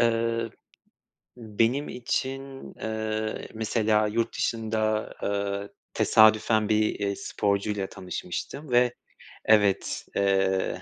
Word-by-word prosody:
Eee, 115 0 +1 0.9
benim 115 +5 0
için, 135 +2 -4
eee, 110 0 -3
mesela 110 -1 +1
yurt 115 +2 -1
dışında, 110 -1 -1
eee, 100 0 -2 0.2
tesadüfen 110 0 +4
bir, 110 -1 +2
eee, 100 -1 -1
sporcuyla 100 -1 -1
tanışmıştım 95 - -6
ve 125 0 +4 0.5
evet, 105 -3 +3
eee, 95 -2 +1
110 Hz, 90 wpm, -26 LUFS, 100-115 Hz, 0.9 s, tesadüfen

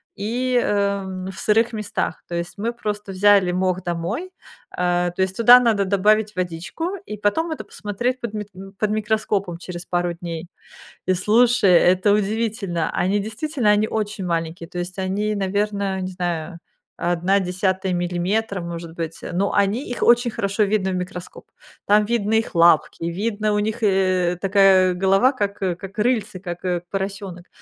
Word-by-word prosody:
и, 245 +4 0
эм, 200 -2 -1
в 185 - -11
сырых 225 +2 +2
местах. 215 -2 -3
То 170 - -5
есть 170 +3 -4
мы 230 +3 -2
просто 210 -3 -4
взяли 195 -1 +4
мох 185 0 0
домой, 180 - -3 0.5
э, 175 0 +1
то 190 - -1
есть 190 0 -1
туда 245 +2 +8
надо 220 -5 +2
добавить 210 +2 +2
водичку 180 - -3
и 210 - -6
потом 320 +12 0
это 315 - -4
посмотреть 240 +5 -3
под 230 -3 -4
мит 210 -1 -5 0.3
под 215 - +1
микроскопом 210 -4 -1
через 175 0 -8
пару 175 -1 -1
дней. 170 0 -6 0.6
И 185 - +3
слушай, 220 +2 +3
это 185 +3 +4
удивительно, 210 -4 -1
они 190 +3 +1
действительно, 225 +2 -1
они 210 +1 +3
очень 210 -3 -3
маленькие, 165 0 -3
то 180 - -7
есть 180 +2 -5
они, 205 +3 -1
наверно, 200 0 -1
не 185 0 -4
знаю, 175 -1 -3 0.4
1/10 185 +2 0
миллиметра, 180 +4 -1
может 170 -1 -7
быть, 165 -1 -5
но 195 +3 0
они, 205 +6 +1
их 245 - -5
очень 240 0 +4
хорошо 205 0 0
видно 200 -2 0
в 185 - -1
микроскоп. 180 0 -7 0.4
Там 210 +1 +4
видно 220 -2 0
их 225 -2 0
лапки, 165 -1 +4
видно 210 +5 -1
у 210 - +2
них 220 +2 -3
и, 185 -3 +2
и - - -14
такая 195 -2 +4
голова, 195 +7 +3
как, 205 -5 -3
э, 180 -2 0
как 195 +3 -10
рыльце, 215 -4 0
как, 175 -1 -7
э, 180 -2 0
поросёнок, 195 -2 -5
195 Hz, 165 wpm, -22 LUFS, 180-215 Hz, 0.6 s, туда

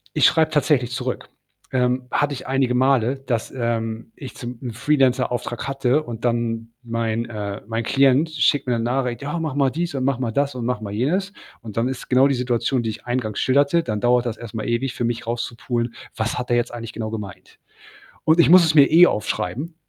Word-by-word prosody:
ich - - +4
schreibe 160 -1 +4
tatsächlich 145 -5 +2
zurück. 125 - -4 0.4
Ähm, 125 0 +1
hatte 145 0 +1
ich 130 - -7
einige 130 -1 +1
Male, 130 -1 +3
dass, 130 -4 -3
ähm, 115 -2 -3
ich 135 -3 -9
zum 120 0 -7
'n 125 -3 -4
Freelancer-Auftrag 125 -2 0
hatte 135 +2 +1
und 115 -5 -8
dann 115 -1 -1
mein, 115 -1 -2
äh 105 -3 -5
mein 115 +1 -2
Klient 135 +5 +3
schickt 145 -3 +1
mir 125 - +1
'ne 115 - -2
Nachricht: 125 +1 -1
„Ja, 150 +4 -3
mach 155 -4 -3
mal 140 -2 +2
dies 170 0 -3
und 130 - -1
mach 135 -2 0
mal 125 -3 -1
das 140 +4 0
und 125 -2 -5
mach 125 -2 -1
mal 100 -2 -6
jenes.“ 180 - -1 0.3
Und 110 -2 -9
dann 115 +2 +2
ist 130 -1 -6
genau 130 +2 +6
die 140 - +1
Situation, 125 0 0
die 110 - -1
ich 110 - -11
eingangs 120 -4 -2
schilderte, 140 +5 +3
dann 105 -8 -3
dauert 120 0 +3
das 115 - -4
erst 120 -1 -9
mal 110 -1 -4
ewig 120 +2 -1
für 120 - -4
mich 115 0 -2
rauszupulen: 120 0 -3 0.2
„Was 110 +1 -2
hat 125 0 -4
er 120 - +4
jetzt 120 - -1
eigentlich 115 -2 -7
genau 110 0 -4
gemeint?“ 105 -3 -8 0.7
Und 160 +2 +4
ich - - +5
muss 180 +1 +8
es 160 -1 +2
mir 140 -2 +8
eh 170 +3 +8
aufschreiben, 120 - -3
125 Hz, 215 wpm, -22 LUFS, 115-140 Hz, 0.7 s, muss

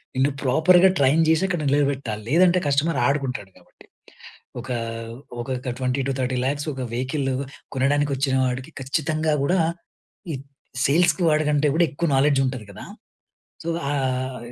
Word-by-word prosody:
నిన్ను 135 +2 +2
ప్రాపర్‌గా 175 +8 +5
ట్రైన్ 145 +4 +4
జేసి 160 +3 +3
అక్కడ 175 -4 -2
నిలబెట్టాలి. 135 -7 -1
లేదంటే 180 +3 +4
కస్టమర్ 145 +4 +1
ఆడుకుంటాడు 135 -8 -2
కాబట్టి. - - -21 0.7
ఒక 130 +2 -9 0.7
ఒకొక్క 125 +1 -4
20-30 130 0 -1
లాక్స్ 145 +2 -1
ఒక 130 -1 -5
వెహికల్ 135 +2 -2 0.4
కొనడానికి 145 +2 +1
వచ్చిన 135 0 0
వాడికి, 125 +1 -3
ఖచ్చితంగా 155 +3 0
గూడా 180 +5 +2 0.7
ఈ - - -2 0.5
సేల్స్‌కి 170 +3 +3
వాడికంటే 150 -1 +2
కూడా 170 0 +4
ఎక్కువ 170 +3 -2
నాలెడ్జ్ 140 0 +3
ఉంటది 130 -5 -4
గదా! - - -10 0.8
సో 170 - -3 0.2
ఆహ్, 130 -2 -1
140 Hz, 130 wpm, -23 LUFS, 130-155 Hz, 0.8 s, ప్రాపర్‌గా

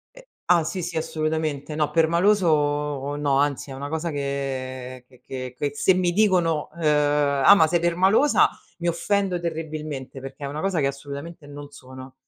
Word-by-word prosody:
Eh - - -15 0.2
ah, 175 -2 +5
sì, 175 +4 -4
sì, 170 -1 -4
assolutamente. 155 -2 -2
No 150 -1 0
permaloso 150 -5 +1
no, 145 -2 +1
anzi 145 -1 -1
è - - -6
una 140 +2 -6
cosa 160 +1 -3
che 130 -3 -4
che 125 - -22
che 130 -1 -6
che 145 -1 -1
se 190 +5 +3
mi 180 -1 +1
dicono, 175 -6 +2
ehm: 145 -2 +2
"Ah, 200 - +10
ma 160 -4 +4
sei 170 +2 +1
permalosa", 185 - +3 0.3
mi 175 - -2
offendo 190 +2 0
terribilmente, 155 -5 -5
perché 135 +1 -8
è - - -3
una 150 +2 -5
cosa 195 -3 0
che 140 - +2
assolutamente 145 +3 -7
non 145 0 -9
sono. 130 -1 -12
150 Hz, 170 wpm, -24 LUFS, 140-170 Hz, 0.3 s, Ah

